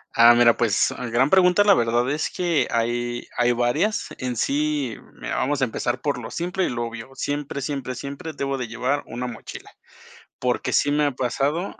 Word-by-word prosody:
Ah, 115 +1 +8
mira, 120 -1 +5
pues, 115 -5 +2 0.2
gran 125 +4 +3
pregunta, 185 +2 +5
la 205 -1 +6
verdad 120 0 +1
es 150 +2 -1
que 175 -3 +1
hay 120 +1 -1
hay 120 0 +3
varias. 125 - 0
En 125 -1 -3
sí, 145 0 0 0.2
mira, - - -5
vamos 145 +1 0
a - - +4
empezar 120 +1 -2
por 145 -3 -1
lo 110 - -8
simple 180 +2 -2
y - - +1
lo 120 -1 -2
obvio. 115 +1 -8
Siempre, 145 +1 -3
siempre, 135 -2 -3
siempre 140 +5 -7
debo 140 -1 -2
de 125 -2 -4
llevar 125 +5 -1
una 125 +2 -5
mochila. 115 -3 -9 0.7
Porque 125 -1 -1
sí 145 - +3
me 150 0 +2
ha 145 - +1
pasado 140 +7 -1
130 Hz, 190 wpm, -23 LUFS, 120-145 Hz, 0.7 s, Ah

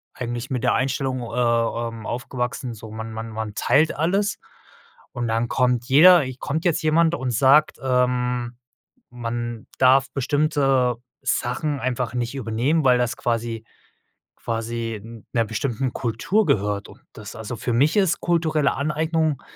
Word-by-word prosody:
eigentlich 120 0 -4
mit 125 -3 -2
der 125 - +3
Einstellung, 130 -1 -1
äh, - - -5 0.6
ähm, 115 -1 -8
aufgewachsen, 125 0 -4
so: 110 0 -11
„Man 110 0 -6
man 115 +1 -6
man 110 -1 -5
teilt 155 +2 +2
alles.“ 195 +7 0 0.7
Und 120 -1 -3
dann 115 +1 0
kommt 125 -1 +1
jeder 170 +5 +7 0.2
kommt 155 +5 -3
jetzt 170 -3 +2
jemand 160 +1 +3
und 130 -5 -3
sagt, 135 +6 +4
ähm: 125 -2 0 0.5
„Man 120 -1 -5
darf 135 +1 +4
bestimmte 135 -2 +1 0.3
Sachen 135 +4 -1
einfach 125 -1 -2
nicht 120 +2 -2
übernehmen, 130 +6 0
weil 125 -2 +5
das 120 -2 0
quasi 115 -2 -2 0.7
quasi 115 -1 -4
'n 115 -1 -12
'ner 115 -1 +2
bestimmten 120 +3 -2
Kultur 130 - 0
gehört.“ 100 0 0
Und - - -16
das 105 0 -10
also, 110 +1 -6
für 120 +3 -2
mich 145 - +3
ist 190 -4 +2
kulturelle 160 -4 +1
Aneignung 155 +1 0
125 Hz, 145 wpm, -23 LUFS, 115-145 Hz, 0.7 s, jeder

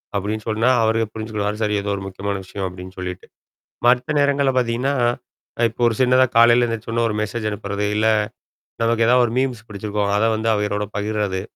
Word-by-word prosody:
அப்படின்னு 105 +2 -2
சொன்னா 110 +3 +2
அவரு 110 0 +2
புரிஞ்சுக்கிடுவாரு. 105 -1 -3
சரி 105 0 +1
ஏதோ 100 - -4
ஒரு 95 - -6
முக்கியமான 100 +1 -4
விஷயம் 95 0 -5
அப்படின்னு 90 +1 -10
சொல்லிட்டு. 90 0 -6 0.6
மத்த 125 +4 +3
நேரங்கள்ல 140 -1 +2
பார்த்தீங்கன்னா. 125 +3 0 0.7
அ - - +2
இப்ப 115 - -16
ஒரு 115 - -1
சின்னதா 130 +1 +5
காலையில 120 +1 +6
எந்திரிச்ச 115 -1 -5
உடன்னே 115 0 +1
ஒரு 105 - -3
மெசேஜ் 110 0 -3
அனுப்புறது 100 0 -3
இல்ல. 110 +1 +2 0.8
நமக்கு 115 0 +2
ஏதாவது 125 0 +5
ஒரு 115 - -5
மீம்ஸ் 125 -4 -3
புடிச்சிருக்கும். 105 0 -2
அத 110 - +2
வந்து 110 +1 -2
அவங்களோட 105 0 -1
பகிர்றது. 105 -2 -2
110 Hz, 175 wpm, -21 LUFS, 100-120 Hz, 0.8 s, காலையில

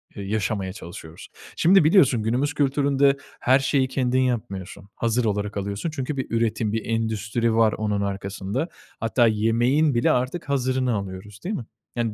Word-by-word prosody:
eee, 100 - -6
yaşamaya 100 -2 -2
çalışıyoruz?" 85 -4 -10 0.3
Şimdi, 185 +1 +5
biliyorsun 145 - +4
günümüz 130 +6 0
kültüründe 140 -1 +2 0.2
her 130 +2 +4
şeyi 135 -1 +1
kendin 130 -1 0
yapmıyorsun, 100 -6 -3
hazır 115 +1 0
olarak 105 -1 -1
alıyorsun 100 - -3
çünkü 145 -1 -4
bir 130 - -1
üretim, 115 -2 0
bir 115 - -2
endüstri 115 0 -1
var 115 -1 +4
onun 105 -1 -1
arkasında. 100 - -3 0.3
Hatta 115 +1 +3
yemeğin 120 +7 +2
bile 120 - +3
artık 130 +6 -1
hazırını 130 -2 +1
alıyoruz, 100 0 -6
değil 210 +4 -1
mi? 120 - -5 0.3
Yani, 115 -2 -1
115 Hz, 155 wpm, -24 LUFS, 105-135 Hz, 0.3 s, Şimdi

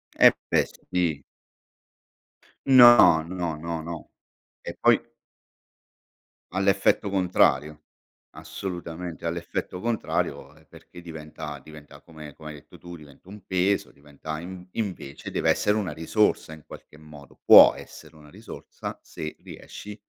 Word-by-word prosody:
Eh - - +7 0.2
beh, - - +3 0.3
sì. 85 -5 0 1.5
No, 120 -11 +7
no, 85 -1 -4
no, 85 +1 -5
no, 85 0 -8 0.6
e - - -6
poi - - +4 1.5
ha - - -4
l'effetto 100 +1 +1
contrario, 75 -5 +1 0.5
assolutamente, 85 -2 -7
ha - - +1
l'effetto 85 +1 -5
contrario 100 -10 -3
e 80 - -23
perché 90 - -15
diventa 75 -3 -9
diventa 75 -1 -14
come 75 -3 -12
come 80 -1 -11
hai 75 - -9
detto 70 - -16
tu, 85 0 -10
diventa 75 +3 -17
un 100 -1 -13
peso, 95 +2 0
diventa 75 +2 -9
inv 90 +1 -10
invece 95 -10 -6
deve - - +1
essere 105 +1 +1
una 95 -6 -3
risorsa 80 +1 0
in 80 -1 -13
qualche 75 - -14
modo, 75 -2 -15
può - - +9
essere - - -13
una 75 -1 -17
risorsa - - -9
se 75 0 -8
riesci 105 0 -11
80 Hz, 130 wpm, -25 LUFS, 75-95 Hz, 1.5 s, può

